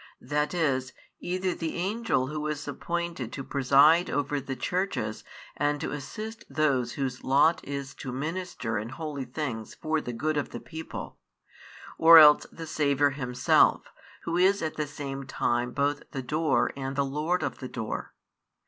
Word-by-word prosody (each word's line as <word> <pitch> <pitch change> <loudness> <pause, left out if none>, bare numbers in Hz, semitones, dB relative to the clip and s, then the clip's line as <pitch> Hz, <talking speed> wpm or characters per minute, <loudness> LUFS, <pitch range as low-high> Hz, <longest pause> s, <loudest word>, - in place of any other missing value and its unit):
That 150 +3 -1
is, 135 -6 0 0.3
either 185 0 -1
the 165 -2 -4
Angel 195 - 0
who 150 +2 -4
is 150 -1 -4
appointed 170 -4 -3
to 135 - -5
preside 140 +6 +4
over 145 0 -1
the 135 0 -5
churches 180 - -2 0.3
and 145 0 0
to - - -3
assist 215 - -6
those 135 -4 +1
whose 130 -2 -3
lot 145 +5 +3
is 140 0 -5
to 130 - -5
minister 145 - -3
in 110 +2 -6
holy 140 0 -5
things 125 -9 -5
for 155 0 -1
the 125 - -5
good 155 +6 -1
of 145 - -1
the 120 - -7
people, 160 +8 -8 0.8
or 165 +1 +10
else 150 -2 +8
the 165 - -8
Saviour 145 -2 +2
Himself, 125 -2 +2 0.3
Who 170 +1 -1
is 190 +1 +3
at 155 - -2
the 150 -1 -2
same 140 -2 -6
time 120 -1 0
both 145 +2 0
the 135 - -3
Door 155 +2 +1
and 135 0 -4
the 140 0 +1
Lord 150 +6 -1
of - - -3
the 130 - -6
Door. 115 -3 -5
145 Hz, 165 wpm, -28 LUFS, 135-160 Hz, 0.8 s, or